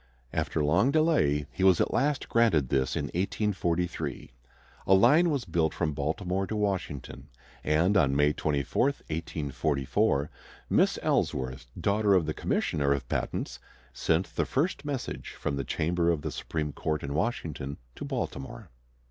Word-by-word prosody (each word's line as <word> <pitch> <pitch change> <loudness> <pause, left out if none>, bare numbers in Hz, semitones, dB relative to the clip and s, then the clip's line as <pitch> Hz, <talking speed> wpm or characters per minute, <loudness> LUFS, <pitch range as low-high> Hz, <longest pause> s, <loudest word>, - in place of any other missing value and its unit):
After 80 - 0
long 90 - +3
delay 140 - +2
he 95 - -3
was 95 -2 +6
at - - +1
last 145 0 +1
granted 100 - +3
this 65 -1 +1
in - - -1
1843. 90 -5 -1 0.6
A 95 - +6
line 155 - +5
was 140 -7 -1
built 80 -3 0
from 75 -3 -1
Baltimore 90 +7 -1
to 110 - -3
Washington, 95 -9 -3 0.4
and 80 +6 +2
on 70 -8 +3
May 75 +1 +4
24, 75 - 0
1844, 75 - -1 0.4
Miss - - +3
Ellsworth, 65 -1 -1
daughter 100 0 +3
of 90 -4 +3
the 80 - -2
Commissioner 70 -2 0
of 70 - -4
Patents, - - -2 0.3
sent 85 +3 0
the - - +1
first 145 +1 0
message 140 -4 -4
from 70 - -1
the 70 - -2
chamber 85 +5 0
of 80 -4 0
the 80 - -3
Supreme 75 -1 -3
Court 75 0 -2
in 70 0 -3
Washington 75 - -2 0.2
to - - -7
Baltimore. 75 - -5
80 Hz, 150 wpm, -28 LUFS, 70-100 Hz, 0.6 s, was